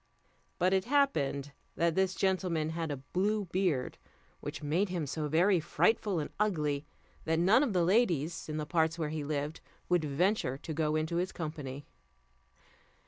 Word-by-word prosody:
But 185 +1 +2
it 190 +1 +2
happened 150 - +1 0.2
that 170 -1 +2
this 190 +1 +1
gentleman 180 -4 0
had 165 -1 -3
a 145 - -2 0.2
blue 205 +3 +1
beard, 175 -7 -1 0.4
which 145 - -6
made 170 +7 +1
him 175 -4 -2
so 150 +2 -3
very 175 +5 +4
frightful 195 +4 +1
and 150 - -3
ugly, 150 -9 0 0.4
that 160 0 +1
none 190 +9 +5
of 270 -8 +1
the 180 -2 +3
ladies, 170 - +1
in 155 - -3
the 155 - -2
parts 160 +1 +1
where 155 -3 -2
he 155 -1 -3
lived, 145 +1 -3 0.3
would 175 -2 +3
venture 150 -1 +1
to 160 +3 -6
go 155 0 0
into 155 +2 -1
his 180 +2 0
company. 145 -4 -6
165 Hz, 165 wpm, -31 LUFS, 150-185 Hz, 0.4 s, none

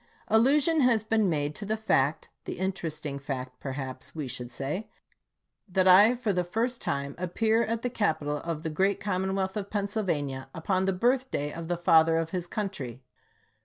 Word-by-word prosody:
Allusion 285 +8 +4
has 235 -4 +3
been 220 -2 +2
made 145 -2 -1
to 210 - -6
the 215 +2 -1
fact 150 -9 +1
— - - -53
the - - -5
interesting 160 -6 -3
fact, 130 -2 -5
perhaps 135 0 -6
we 150 -4 -3
should 125 0 -5
say 150 - -4 0.4
— - - -45
that 190 -1 +4
I 205 +6 +8
for 235 -4 -1
the 180 -1 +1
first 230 +7 -1
time 140 0 -2
appear 220 +6 +1
at 230 0 -2
the 250 - 0
capital 155 -10 0
of 165 0 -4
the 160 - -2
great 195 +5 +1
commonwealth 190 -1 -1
of 200 -2 -4
Pennsylvania 180 -11 -2
upon 185 +3 0
the 195 - +2
birthday 240 - 0
of 165 0 -6
the 175 0 -1
Father 165 -2 +5
of 165 0 -2
his 180 -2 -3
Country. 145 - -4
180 Hz, 180 wpm, -28 LUFS, 150-215 Hz, 0.4 s, I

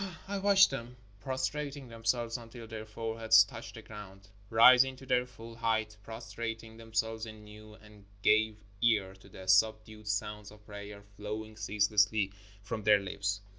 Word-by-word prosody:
I 200 0 -2
watched 195 -2 +6
them 125 -1 -6 0.2
prostrating 135 +2 -3
themselves 115 0 -1
until 115 -1 -8
their 110 -1 -8
foreheads 110 0 +4
touched 110 +2 -10
the 115 - -10
ground, 100 -2 -11 0.2
rising 125 +3 +7
to 135 - -13
their 125 -1 +1
full 115 -2 -11
height, 110 -2 -1
prostrating 115 +1 -6
themselves 110 0 -2
anew, 105 0 -12
and 105 -2 -17 0.2
gave 110 -1 +3 0.2
ear 105 -5 +2
to 95 +1 -18
the 95 0 -11
sub 110 +3 +4
dued 110 -1 -13
sounds 105 0 -3
of 105 0 -17
prayer 100 0 -9
flowing 110 +1 -6
ceaselessly 105 -1 +2 0.3
from 110 +2 -4
their 105 0 +6
lips. 100 +1 -3
110 Hz, 150 wpm, -31 LUFS, 105-115 Hz, 0.3 s, rising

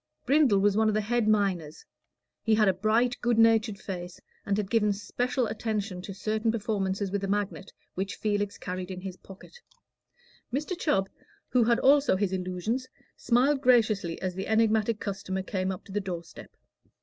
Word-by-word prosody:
Brindle 270 -5 +4
was 200 0 +3
one 220 +1 +3
of 215 - +1
the 215 - +2
head 230 +1 0
miners: 190 -8 0 0.6
he 220 -1 +2
had 215 -1 +4
a 190 - +4
bright 225 +6 +1
good 240 -1 +1
natured 225 -2 +4
face, 180 -3 -7 0.3
and 200 0 +1
had 205 -2 -3
given 220 -3 +3
especial 245 +5 -1
attention 215 -4 -3
to 195 - -7
certain 215 +3 -1
performances 200 -3 -2
with 200 0 -2
a - - -1
magnet 200 -1 -2 0.2
which 195 +2 -3
Felix 205 -1 -1
carried 180 0 -5
in 185 -1 -6
his 190 -1 -6
pocket. 195 - -14 0.9
Mr. 300 +8 -2
Chubb, 195 - +1 0.4
who 245 -3 +3
had 235 0 +3
also 280 -4 +5
his 195 0 0
illusions, 185 +7 -2 0.3
smiled 260 +4 +2
graciously 215 - +3
as 185 -1 -1
the 190 +2 -5
enigmatic 220 0 +2
customer 190 -1 -4
came 190 -1 -2
up 185 - -7
to - - -12
the 205 +1 -1
door 180 -3 -5
step. 165 - -13
205 Hz, 175 wpm, -28 LUFS, 190-230 Hz, 0.9 s, also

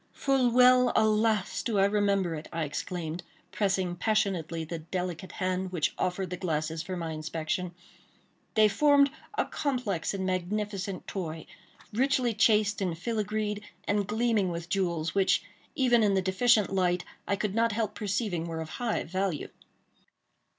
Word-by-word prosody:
"Full 270 -3 +2
well—alas! 225 -4 +4
do 225 -4 -1
I 195 - +5
remember 200 -3 +1
it," 155 0 -6
I 165 -1 -2
exclaimed, 160 +3 -4 0.3
pressing 190 -3 0
passionately 175 -5 0
the 165 +1 -5
delicate 180 +1 -4
hand 185 0 -2
which 170 -5 0
offered 185 0 -2
the 180 - -3
glasses 160 -2 -2
for 185 +2 -5
my 165 -2 -3
inspection. 160 +3 -3 0.8
They 215 -1 +6
formed 280 +5 +4 0.3
a - - +2
complex 245 - -2
and 190 -1 -2
magnificent 195 +1 -2
toy, 165 -4 -5 0.5
richly 255 0 +2
chased 210 -1 +3
and 175 -4 -1
filigreed, 210 0 -2 0.2
and 205 -1 0
gleaming 220 -3 +1
with 170 0 -5
jewels, 170 -4 0
which, 195 -1 +3 0.3
even 250 -5 +4
in 205 -2 +3
the 190 - +3
deficient 205 +2 +3
light, 180 -2 +1 0.2
I 200 - +2
could 200 0 -2
not 230 +1 +2
help 220 0 -1
perceiving 195 -4 -2
were 165 -1 -4
of 160 -1 -5
high 235 -3 0
value. 185 -2 -2
195 Hz, 145 wpm, -29 LUFS, 175-215 Hz, 0.8 s, They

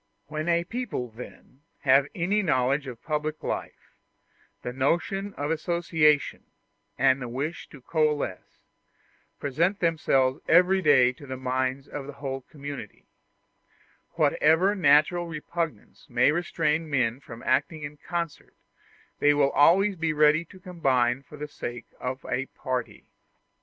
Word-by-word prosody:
When 155 +2 -3
a 170 0 +3
people, 230 - -4
then, 125 +3 -12 0.2
have 135 0 +4
any 195 +5 +1
knowledge 135 -4 +1
of 120 -3 -9
public 155 0 -3
life, - - -5 0.7
the 125 - -4
notion 175 +9 -1
of 145 +2 -2
association, 160 -3 +1 0.5
and 135 0 +3
the 125 - -4
wish 140 +7 -4
to 140 - -13
coalesce, 150 - -2 0.8
present 170 +8 0
themselves 135 -5 +1
every 185 +3 +5
day 130 -6 +5
to 140 +2 -13
the 130 0 -5
minds 130 +1 -2
of 140 -2 -7
the 145 - -7
whole 135 -1 -5
community: 140 -4 -9 1.1
whatever 165 +6 +3
natural 170 0 +3
repugnance 165 0 -5
may 125 +3 +4
restrain 160 -1 -1
men 125 -4 +1
from 120 -4 -11
acting 150 +4 0
in 145 +1 -7
concert, 170 +1 -5 0.6
they 145 0 +4
will 140 -1 +3
always 190 +8 +4
be 165 -2 -1
ready 150 +1 +4
to 185 - -15
combine 135 -9 +1
for 150 +2 -13
the 150 +1 -5
sake 120 -5 -7
of 130 +1 -5
a 135 +1 -2
party. 130 -3 -5
145 Hz, 135 wpm, -26 LUFS, 130-165 Hz, 1.1 s, every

